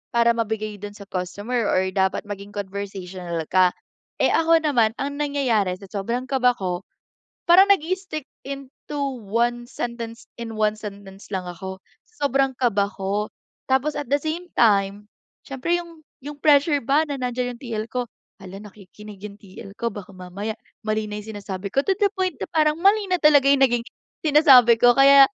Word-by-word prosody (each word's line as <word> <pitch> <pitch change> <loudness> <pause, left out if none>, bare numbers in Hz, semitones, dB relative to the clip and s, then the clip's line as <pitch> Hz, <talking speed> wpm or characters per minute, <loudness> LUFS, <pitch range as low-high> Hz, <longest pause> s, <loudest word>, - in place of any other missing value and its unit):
para 235 0 +5
mabigay 215 -2 -2
dun 205 0 -8
sa 205 - -10
customer 205 +6 -2
or 190 0 +2
dapat 190 +2 0
maging 200 0 -7
conversational 190 -4 -5
ka. 185 -1 +5 0.5
Eh, - - +3
ako 330 0 +4
naman, 235 -7 +3
ang 280 +1 -3
nangyayari 245 -10 +1
sa 195 - -12
sobrang 235 +5 -2
kaba 250 -2 +3
ko, 180 -2 -3 0.7
parang 380 +3 +7
nag-i-stick 370 -4 -2 0.2
into 275 +1 -8 0.3
1 240 +3 0
sentence 235 -2 -6 0.2
in 225 -2 -6
1 215 0 +1
sentence 200 -1 -10
lang 185 -1 -2
ako. 190 +2 -7 0.4
Sobrang 275 -1 +2
kaba 205 -5 +2
ko, 200 +2 -2 0.4
tapos 280 +3 +1
at 285 - -7
the 285 0 +2
same 335 +4 -4
time, 205 -1 +2 0.4
siyempre 275 +6 -1
yung 335 -2 -10 0.2
yung 290 0 -7
pressure 290 -1 +4
ba 290 +5 +3
na 285 - -3
nandyan 245 0 -2
yung - - -23
TL 220 -3 -4
ko. 250 -2 -2 0.3
Hala 195 +1 -9
nakikinig 210 0 -13
yung 205 -1 -8
TL 195 0 -11
ko 235 - +1
baka 200 -1 -9
mamaya, 185 +4 -5 0.3
mali 215 0 -1
na 210 - -5
yung 220 +1 -9
sinasabi 200 0 -6
ko 275 - +3
to 385 -1 +2
the 405 -2 +2
point 370 -4 -2 0.2
parang 305 -1 +3
mali 400 +2 +3
nagiging 280 -7 +4 0.4
sinasabi 265 -6 +7
ko 245 +1 +6
kaya, 275 +1 +8
235 Hz, 160 wpm, -23 LUFS, 200-280 Hz, 0.7 s, kaya